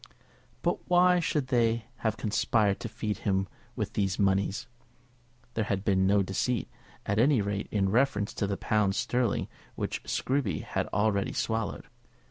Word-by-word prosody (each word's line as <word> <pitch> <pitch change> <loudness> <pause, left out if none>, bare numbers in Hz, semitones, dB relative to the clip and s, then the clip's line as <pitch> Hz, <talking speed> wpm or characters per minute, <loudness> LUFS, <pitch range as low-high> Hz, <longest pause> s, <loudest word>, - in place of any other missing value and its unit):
But - - -1
why 180 0 +5
should 150 -5 -1
they 115 -2 +2
have 110 -1 -1
conspired 105 -1 +1
to 115 - -5
feed 105 -1 -3
him 95 -2 0 0.3
with - - -3
these 95 -2 0
moneys? 100 +4 +1 0.9
There 110 - 0
had 100 -1 -2
been 95 -2 +3
no 100 0 +4
deceit, 105 +6 -1 0.4
at 100 +1 0
any 135 +1 +5
rate, 100 0 -2
in 100 -2 +1
reference 110 -2 +1
to 100 - -1
the 100 0 -2
pounds 105 -2 +1
sterling 125 -3 0 0.3
which - - -3
Scruby 130 - -1
had - - -2
already 100 0 +1
swallowed. 110 -4 -2
105 Hz, 150 wpm, -29 LUFS, 100-120 Hz, 0.9 s, why